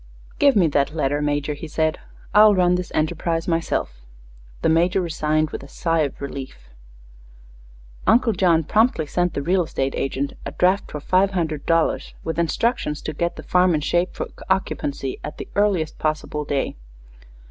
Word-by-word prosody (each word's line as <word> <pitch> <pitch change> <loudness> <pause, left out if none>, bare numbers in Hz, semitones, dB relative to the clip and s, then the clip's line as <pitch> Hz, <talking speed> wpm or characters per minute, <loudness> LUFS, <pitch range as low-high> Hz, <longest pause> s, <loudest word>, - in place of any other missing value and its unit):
"Give 280 -3 +5
me 190 -4 +5
that 145 +1 0
letter, 145 -1 0
Major," 145 0 -1
he 145 +3 -8
said; 155 +1 0 0.3
"I'll 210 0 +7
run 180 -1 +3
this 180 0 -2
enterprise 165 +1 -1
myself." 165 - -1 0.6
The - - +3
Major 175 +4 +3
resigned 155 -3 0
with - - -5
a - - -11
sigh 165 -1 -1
of 145 -3 -1
relief. 130 - -8 1.4
Uncle 225 +1 +4
John 170 -3 +3
promptly 215 - +2
sent 175 +3 -1
the 140 - -2
real 180 +4 +2
estate 135 -4 -2
agent 135 +1 -2
a - - -6
draft 185 +3 +2
for 150 - -5
five 185 +5 +3
hundred 155 -5 -2
dollars, 165 -1 +1
with 160 +1 -3
instructions 170 -2 0
to 155 - -4
get 170 +3 -2
the - - -9
farm 180 -1 +3
in 150 - -1
shape 175 +4 0
for - - -3 0.2
occupancy 145 -8 -1
at - - -6
the - - -7
earliest 195 -7 +1
possible 155 -1 -2
day. 140 -1 -1
165 Hz, 170 wpm, -22 LUFS, 150-180 Hz, 1.4 s, I'll